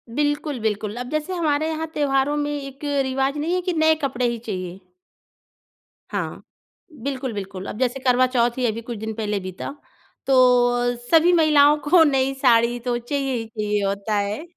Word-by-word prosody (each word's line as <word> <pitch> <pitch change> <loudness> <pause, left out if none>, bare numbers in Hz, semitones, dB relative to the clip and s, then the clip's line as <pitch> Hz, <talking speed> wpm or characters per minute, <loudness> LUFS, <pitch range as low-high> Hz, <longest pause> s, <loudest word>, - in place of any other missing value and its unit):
बिल्कुल 290 -1 -1
बिल्कुल। 215 -1 -2
अब 245 0 -5
जैसे 310 +4 -2
हमारे 310 -3 0
यहाँ 320 0 -3
त्योहारों 280 0 +1
में 295 0 -1
एक 275 0 -10 0.2
रिवाज़ 265 +2 -1
नहीं 320 +4 -1
है 365 - +1
कि 360 0 -2
नए 315 0 +4
कपड़े 255 -2 -1
ही 235 0 -2
चहिए। 185 -5 -6 1.3
हाँ, - - -4 0.6
बिल्कुल, 265 -2 -3
बिल्कुल। 195 -2 -6
अब - - -6
जैसे 255 +1 0
करवा 255 -1 +3
चौथ 240 0 +2
ही 255 - 0
अभी 225 0 -1
कुछ 230 0 -7
दिन 220 +1 -5
पहले 210 -2 -2
बीता, 185 +8 -7 0.5
तो 270 - +1 0.6
अ, - - -7 0.2
सभी 335 +2 +5
महिलाओं 300 -3 +5
को 350 -1 +7
नई 270 -3 +2
साड़ी 240 -1 +3
तो 240 0 -2
चाहिए 270 +2 -2
ही 225 - -3
चाहिए 210 -2 -2
होता 200 +2 -2
है। 205 +9 -2
260 Hz, 175 wpm, -22 LUFS, 220-290 Hz, 1.3 s, को